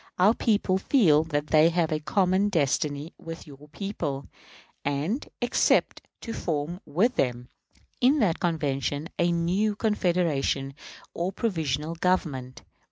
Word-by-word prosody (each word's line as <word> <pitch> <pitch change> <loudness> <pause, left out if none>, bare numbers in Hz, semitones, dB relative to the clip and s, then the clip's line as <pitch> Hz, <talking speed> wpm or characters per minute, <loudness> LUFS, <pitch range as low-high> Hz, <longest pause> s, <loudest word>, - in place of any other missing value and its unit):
Our 195 +5 +5
people 205 -5 +1
feel 175 - +4
that 145 -2 -1
they 155 +1 +6
have 170 -2 0
a 155 - 0
common 185 +5 +2
destiny 150 -2 0
with 165 0 -8
your 145 -1 -14
people, 150 -6 -4 0.6
and 150 - -2
expect 245 - +2 0.2
to 230 - -5
form 165 0 -3
with 200 - +1
them, 125 -1 -1 0.5
in 265 +5 +5
that 200 - +1
Convention, 150 -2 -1
a 175 0 +3
new 185 +5 +1
Confederation 170 -10 0 0.4
and 180 +3 -2
Provisional 160 - -1
Government. 155 -8 -1
165 Hz, 125 wpm, -26 LUFS, 145-190 Hz, 0.6 s, they